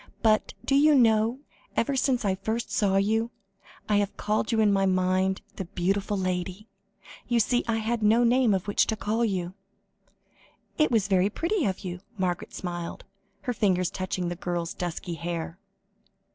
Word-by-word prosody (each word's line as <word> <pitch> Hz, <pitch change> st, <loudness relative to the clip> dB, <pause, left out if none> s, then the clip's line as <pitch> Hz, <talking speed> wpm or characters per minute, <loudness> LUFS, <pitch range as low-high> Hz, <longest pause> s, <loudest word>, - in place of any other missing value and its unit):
But, 215 Hz, -1 st, +2 dB
do -, -, +1 dB
you 295 Hz, +2 st, +6 dB
know, 230 Hz, 0 st, +3 dB, 0.3 s
ever 270 Hz, +4 st, +1 dB
since 260 Hz, -3 st, +1 dB
I 195 Hz, -, +2 dB
first 220 Hz, +5 st, -3 dB
saw 195 Hz, -2 st, +2 dB
you, 220 Hz, +4 st, +1 dB, 0.6 s
I 210 Hz, -, +3 dB
have 205 Hz, -1 st, -1 dB
called 215 Hz, +2 st, 0 dB
you 225 Hz, -, +2 dB
in 210 Hz, -2 st, +4 dB
my 195 Hz, 0 st, +2 dB
mind 185 Hz, +1 st, +1 dB, 0.2 s
'the 190 Hz, -, -3 dB
beautiful 195 Hz, +3 st, -1 dB
lady.' 185 Hz, +2 st, -3 dB, 0.6 s
You 240 Hz, -1 st, +2 dB
see, 245 Hz, +3 st, +2 dB
I 230 Hz, -, +1 dB
had 225 Hz, +1 st, -1 dB
no 220 Hz, +3 st, +4 dB
name 245 Hz, +1 st, +4 dB
by 195 Hz, -, +4 dB
which 205 Hz, +2 st, +1 dB
to 220 Hz, -, 0 dB
call 220 Hz, +2 st, -1 dB
you." 185 Hz, -5 st, -1 dB, 1.3 s
"It 305 Hz, -, +4 dB
was 220 Hz, -5 st, +2 dB
very 190 Hz, 0 st, +3 dB
pretty 335 Hz, -, -1 dB
of 190 Hz, -1 st, -2 dB
you," 180 Hz, -2 st, -5 dB, 0.2 s
Margaret 180 Hz, -2 st, -2 dB
smiled, 175 Hz, -2 st, -5 dB, 0.4 s
her 250 Hz, -, -2 dB
fingers 185 Hz, -5 st, +1 dB
touching 185 Hz, -1 st, -3 dB
the 175 Hz, -, -3 dB
girl's 175 Hz, -1 st, -3 dB
dusky 175 Hz, 0 st, -4 dB
hair. 170 Hz, +1 st, -4 dB
205 Hz, 170 wpm, -27 LUFS, 185-225 Hz, 1.3 s, you